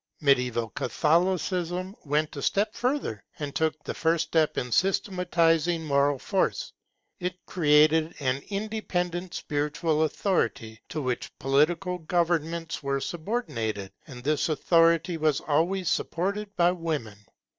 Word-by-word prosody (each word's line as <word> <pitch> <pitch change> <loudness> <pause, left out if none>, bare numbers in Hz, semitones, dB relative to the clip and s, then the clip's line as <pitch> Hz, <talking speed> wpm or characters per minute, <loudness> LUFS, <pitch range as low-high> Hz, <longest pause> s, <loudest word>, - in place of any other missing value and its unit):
Mediaeval 125 -5 +2
Catholicism 180 - 0
went 150 +2 0
a 140 - -5
step 205 +8 +1
further, 245 - -2
and 145 -2 -5
took 155 -1 0
the - - -4
first 165 0 +1
step 160 -2 +2
in 125 - -2
systematizing 175 - +2
moral 140 -1 +2
force. 190 +8 -1 0.5
It 180 0 -5
created 155 -1 +3
an 130 -1 0
independent 185 -4 -3
spiritual 150 +2 -1
authority 115 - -1
to 155 -2 -3
which 125 -1 -3
political 170 +7 +1
governments 165 0 -1
were 140 -1 -1
subordinated, 140 - -3 0.2
and 125 -4 -10
this 150 +3 +1
authority 165 +2 +3
was 155 -3 +2
always 170 +5 0
supported 200 +5 -1
by 175 0 +4
women. 155 - -4
160 Hz, 120 wpm, -27 LUFS, 145-180 Hz, 0.5 s, by